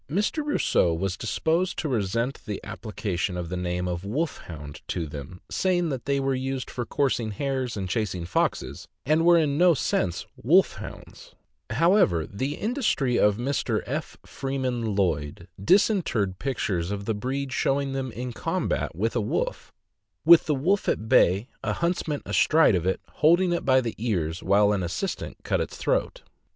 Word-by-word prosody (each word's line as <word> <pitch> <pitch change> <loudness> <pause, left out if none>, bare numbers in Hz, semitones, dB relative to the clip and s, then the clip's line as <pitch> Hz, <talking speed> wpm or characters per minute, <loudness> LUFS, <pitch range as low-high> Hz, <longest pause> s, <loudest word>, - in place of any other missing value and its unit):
Mr. 205 - 0
Rosseau 290 - +2
was 95 +2 -2
disposed 160 - 0
to 160 - -2
resent 115 +1 -1
the 105 -2 -3
application 95 -4 -3
of 85 -2 -4
the 90 - -3
name 90 0 -2
of 90 0 -3
"Wolfhound" 100 - -4
to 85 - -2
them, 75 +4 -8
saying 175 -3 +1
that 130 -4 -4
they 140 0 +1
were 135 0 0
used 130 0 -3
for 120 -3 -4
coursing 125 -5 0
hares 130 +2 -2
and 95 -2 -3
chasing 90 -3 -2
foxes, 85 - -1 0.2
and 155 +3 +3
were 175 0 +6
in 150 -2 +1
no 175 -2 +6
sense 90 -9 -1
wolf - - +3
hounds. - - -10 0.3
However, 130 - +3
the 135 +9 -3
industry 210 - 0
of 105 -1 +4
Mr. 135 +4 -1
F. - - -4
Freeman 130 -5 -2
Lloyd 75 -7 -1 0.2
disinterred 120 - +2
pictures 95 -10 -1
of 100 0 -4
the 110 - 0
breed 130 +5 -3
showing 135 0 0
them 135 -2 -3
in 125 +2 -5
combat - - -2
with 110 +7 -1
a 120 - +2
wolf, 105 - -2 0.5
with 170 0 +8
the 150 - +2
wolf 185 +9 +1
at 110 - -1
bay, 105 -3 +4 0.2
a - - 0
huntsman 170 -4 -1
astride 160 -6 +4
of 90 -1 0
it, 95 - +1
holding 175 +3 +3
it 170 - -1
by 130 -1 +5
the 120 -3 -3
ears 90 -8 -1
while 105 +1 +4
an 100 - 0
assistant 90 - -3
cut - - 0
its - - -5
throat. - - -1
125 Hz, 165 wpm, -26 LUFS, 95-150 Hz, 0.5 s, with